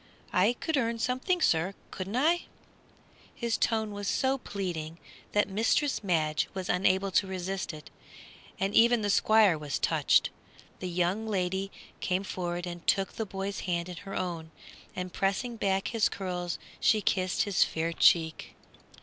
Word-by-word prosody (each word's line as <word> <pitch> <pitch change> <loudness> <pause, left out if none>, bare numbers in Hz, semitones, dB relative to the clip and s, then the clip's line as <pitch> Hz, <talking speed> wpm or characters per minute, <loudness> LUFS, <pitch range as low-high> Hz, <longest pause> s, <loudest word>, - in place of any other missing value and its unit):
"I 195 +6 +4
could 315 +5 -2
earn 230 -2 0
something, 260 - 0
sir, 170 +4 +2 0.2
couldn't 195 +3 -5
I?" 325 +7 +2 0.9
His 235 -2 -1
tone 220 -2 0
was 205 0 -5
so 265 +4 +1
pleading 170 -7 -4 0.4
that 205 - +3
mistress 225 +7 +1
Madge 155 -5 +1
was 190 0 -4
unable 190 +1 +2
to 195 +2 +2
resist 190 0 -3
it, 150 -2 -11 0.7
and 195 +1 0
even 235 -1 +5
the 205 - +1
Squire 210 -6 +4
was 145 -2 -3
touched. - - +3 0.5
The 185 - -4
young 180 +5 0
lady 190 -1 -1 0.3
came 185 +1 0
forward 175 -2 -3
and 175 -1 -8
took 195 -1 +2
the 220 - -3
boy's 195 +1 -4
hand 170 0 -1
in 180 - -7
her 195 +1 -7
own, 170 -3 -3 0.5
and 180 0 -5
pressing 200 +5 -1
back 195 -3 0
his 230 -3 +2
curls, 180 -3 -3 0.2
she 215 0 +3
kissed 185 -1 +1
his 205 -3 +3
fair 165 +1 -2
cheek. 160 -1 +3
195 Hz, 155 wpm, -29 LUFS, 180-220 Hz, 0.9 s, even